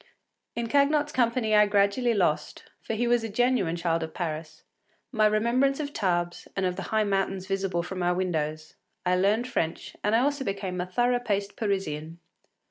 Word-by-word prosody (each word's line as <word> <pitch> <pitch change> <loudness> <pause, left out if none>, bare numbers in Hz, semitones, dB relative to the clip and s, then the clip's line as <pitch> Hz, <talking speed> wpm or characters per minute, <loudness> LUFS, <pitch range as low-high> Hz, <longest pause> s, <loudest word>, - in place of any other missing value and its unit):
In 235 - -2
Cagnotte’s 290 +3 +2
company 235 -3 +1
I 210 0 +6
gradually 205 +4 +2
lost, 175 -6 0 0.2
for 225 - -3
he 240 +2 0
was 240 -1 +3
a 225 - -3
genuine 230 -6 +1
child 170 -1 0
of 160 -1 -6
Paris, 155 -2 -5 0.5
my 215 -4 +4
remembrance 240 +6 +2
of 290 -1 -4
Tarbes 175 -4 -1
and 195 - 0
of 180 -1 0
the - - -5
high 220 0 +2
mountains 195 -2 -1
visible 190 -3 -1
from 185 +1 -5
our 175 0 +2
windows; 155 -4 -2 0.3
I 180 0 +3
learned 205 +6 +2
French 165 -10 -3
and 210 +2 +2
I 230 - +4
also 285 +1 0
became 195 -4 -3
a 180 - -4
thorough 245 +6 +1
paced 205 -4 -2
Parisian. 170 -6 -3
200 Hz, 180 wpm, -27 LUFS, 180-235 Hz, 0.5 s, I